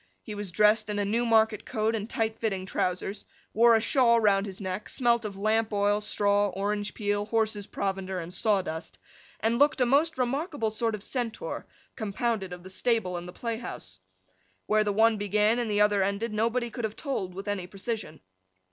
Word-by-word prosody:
He 215 Hz, -, -7 dB
was 205 Hz, -1 st, -4 dB
dressed 210 Hz, +3 st, +3 dB
in 205 Hz, -, -1 dB
a 205 Hz, -, +1 dB
Newmarket 220 Hz, 0 st, +2 dB
coat 220 Hz, +1 st, -1 dB
and 215 Hz, 0 st, -4 dB
tight 220 Hz, -1 st, -1 dB
fitting 195 Hz, -4 st, -1 dB
trousers; 190 Hz, +2 st, -2 dB, 0.3 s
wore 230 Hz, +1 st, +6 dB
a -, -, +4 dB
shawl 235 Hz, 0 st, +4 dB
round 200 Hz, -2 st, +3 dB
his 190 Hz, -1 st, -7 dB
neck; 190 Hz, +1 st, -4 dB
smelt 235 Hz, -3 st, +2 dB
of 200 Hz, -2 st, -5 dB
lamp 220 Hz, +2 st, +1 dB
oil, 205 Hz, 0 st, +2 dB
straw, 205 Hz, -1 st, +2 dB
orange 205 Hz, +2 st, -2 dB
peel, 205 Hz, -1 st, -1 dB
horses' 215 Hz, -2 st, 0 dB
provender, 190 Hz, -1 st, -3 dB
and 170 Hz, +1 st, -7 dB
sawdust; 185 Hz, -5 st, -1 dB, 0.4 s
and 230 Hz, +2 st, +1 dB
looked 290 Hz, -1 st, +4 dB
a 250 Hz, -, +4 dB
most 300 Hz, +6 st, +2 dB
remarkable 265 Hz, -, -1 dB
sort 225 Hz, 0 st, -1 dB
of 205 Hz, -, -9 dB
Centaur, 250 Hz, -, -4 dB, 0.3 s
compounded 215 Hz, -2 st, -2 dB
of 180 Hz, 0 st, -8 dB
the 185 Hz, -, -10 dB
stable 220 Hz, -3 st, 0 dB
and 175 Hz, 0 st, -5 dB
the -, -, -7 dB
play 230 Hz, -2 st, -3 dB
house. 95 Hz, -, -7 dB, 0.7 s
Where 215 Hz, 0 st, +3 dB
the 205 Hz, -, 0 dB
one 220 Hz, +2 st, +4 dB
began, 210 Hz, +3 st, +2 dB
and 235 Hz, -2 st, -1 dB
the 205 Hz, 0 st, +2 dB
other 205 Hz, -1 st, +4 dB
ended, 200 Hz, +3 st, -1 dB
nobody 230 Hz, +2 st, 0 dB
could 240 Hz, -, -5 dB
have 220 Hz, -1 st, -2 dB
told 190 Hz, -11 st, -3 dB
with 195 Hz, +2 st, -7 dB
any 200 Hz, -3 st, -2 dB
precision. 195 Hz, -4 st, -5 dB
210 Hz, 190 wpm, -28 LUFS, 200-230 Hz, 0.7 s, wore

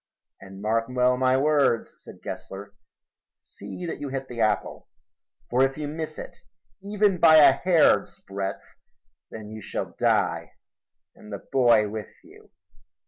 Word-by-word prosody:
"And 95 Hz, +1 st, -12 dB
mark 115 Hz, +1 st, +1 dB
well 125 Hz, 0 st, +2 dB
my 130 Hz, 0 st, +2 dB
words," 140 Hz, -5 st, +1 dB
said -, -, -14 dB
Gessler. 100 Hz, +1 st, -8 dB, 0.7 s
"See 100 Hz, -, -9 dB
that 165 Hz, -, -5 dB
you 145 Hz, -1 st, -5 dB
hit 135 Hz, 0 st, -5 dB
the 120 Hz, -2 st, -5 dB
apple, 110 Hz, -, -1 dB, 0.6 s
for 125 Hz, +2 st, +2 dB
if 135 Hz, +1 st, +1 dB
you 150 Hz, -1 st, -4 dB
miss 155 Hz, +1 st, -6 dB
it, -, -, -9 dB, 0.4 s
even 200 Hz, -2 st, +1 dB
by 160 Hz, -1 st, +7 dB
a 150 Hz, -3 st, +8 dB
hair's 165 Hz, +4 st, +2 dB
breadth, 100 Hz, 0 st, -5 dB, 0.6 s
then 110 Hz, -1 st, -9 dB
you 110 Hz, 0 st, -8 dB
shall -, -, -5 dB
die -, -, 0 dB, 0.6 s
and 105 Hz, -, -15 dB
the 100 Hz, -, -8 dB
boy 120 Hz, -5 st, +4 dB
with 105 Hz, -1 st, -7 dB
you." -, -, -18 dB
125 Hz, 145 wpm, -25 LUFS, 105-150 Hz, 0.7 s, a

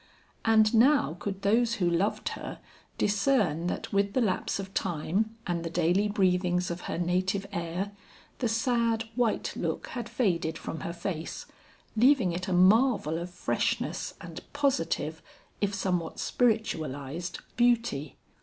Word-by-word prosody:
And 220 Hz, -1 st, +4 dB
now 235 Hz, -, +4 dB
could 195 Hz, -1 st, -4 dB
those 230 Hz, +3 st, +3 dB
who 185 Hz, -6 st, +1 dB
loved 175 Hz, +5 st, 0 dB
her, -, -, -6 dB, 0.4 s
discern 200 Hz, -, +2 dB
that -, -, -4 dB
with 200 Hz, 0 st, +2 dB
the 255 Hz, -, +2 dB
lapse 195 Hz, -5 st, 0 dB
of 195 Hz, -1 st, -6 dB
time 190 Hz, +6 st, -1 dB
and 170 Hz, -2 st, -1 dB
the 165 Hz, -, -3 dB
daily 175 Hz, +4 st, +2 dB
breathings 180 Hz, -3 st, +1 dB
of 170 Hz, +1 st, -5 dB
her -, -, -2 dB
native 185 Hz, +3 st, 0 dB
air, 180 Hz, +2 st, -3 dB, 0.5 s
the 245 Hz, -, +1 dB
sad 230 Hz, 0 st, +1 dB
white 240 Hz, -3 st, 0 dB
look -, -, -3 dB
had 235 Hz, -2 st, -5 dB
faded 175 Hz, -9 st, 0 dB
from 160 Hz, -, -6 dB
her 170 Hz, -, -4 dB
face, 170 Hz, -1 st, -4 dB, 0.5 s
leaving 240 Hz, -4 st, +4 dB
it 180 Hz, +3 st, -4 dB
a -, -, -2 dB
marvel 185 Hz, -, +4 dB
of 175 Hz, +1 st, -5 dB
freshness 180 Hz, -, -2 dB
and -, -, -8 dB
positive, 165 Hz, -, 0 dB, 0.4 s
if 205 Hz, -1 st, 0 dB
somewhat 180 Hz, -4 st, -1 dB
spiritualized, 170 Hz, -, -1 dB, 0.2 s
beauty. 235 Hz, -, +1 dB
195 Hz, 140 wpm, -29 LUFS, 170-225 Hz, 0.5 s, And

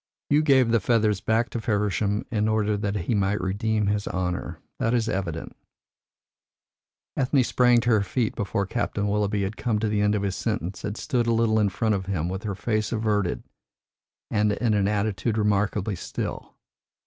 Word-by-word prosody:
You 145 Hz, +1 st, +5 dB
gave 130 Hz, -6 st, +4 dB
the 115 Hz, -, +4 dB
feathers 105 Hz, -1 st, +2 dB
back 110 Hz, +3 st, +1 dB
to 120 Hz, -, -3 dB
Feversham 105 Hz, -1 st, 0 dB
in 105 Hz, -2 st, +1 dB
order 110 Hz, -1 st, +1 dB
that 100 Hz, 0 st, -2 dB
he 100 Hz, +3 st, -1 dB
might 100 Hz, 0 st, +1 dB
redeem 105 Hz, +3 st, 0 dB
his 105 Hz, 0 st, 0 dB
honour. 90 Hz, -1 st, -3 dB, 0.2 s
That 115 Hz, +2 st, +1 dB
is 115 Hz, -2 st, +1 dB
evident." 85 Hz, -6 st, -3 dB, 1.6 s
Ethne 130 Hz, 0 st, +2 dB
sprang 120 Hz, 0 st, +4 dB
to 120 Hz, -, +1 dB
her 110 Hz, -2 st, +4 dB
feet 110 Hz, +3 st, -1 dB
before 100 Hz, -2 st, -1 dB
Captain 105 Hz, -1 st, -2 dB
Willoughby 105 Hz, 0 st, 0 dB
had 95 Hz, +3 st, -4 dB
come 115 Hz, -3 st, 0 dB
to 110 Hz, +1 st, 0 dB
the 105 Hz, -1 st, 0 dB
end 105 Hz, 0 st, +2 dB
of 100 Hz, -, -1 dB
his 95 Hz, -2 st, -1 dB
sentence, 100 Hz, -5 st, -3 dB
and 105 Hz, +1 st, -4 dB
stood 125 Hz, -5 st, -1 dB
a -, -, +3 dB
little 115 Hz, -1 st, +2 dB
in 105 Hz, -1 st, +3 dB
front 110 Hz, +2 st, 0 dB
of 95 Hz, -2 st, -2 dB
him, 90 Hz, -4 st, -1 dB
with 95 Hz, +1 st, -4 dB
her 100 Hz, -2 st, -2 dB
face 110 Hz, +1 st, -1 dB
averted, 105 Hz, -5 st, 0 dB, 0.9 s
and 105 Hz, -1 st, +2 dB
in 115 Hz, +1 st, 0 dB
an 100 Hz, -1 st, +2 dB
attitude 105 Hz, +2 st, -1 dB
remarkably 105 Hz, -1 st, +1 dB
still. -, -, -5 dB
105 Hz, 185 wpm, -25 LUFS, 100-115 Hz, 1.6 s, You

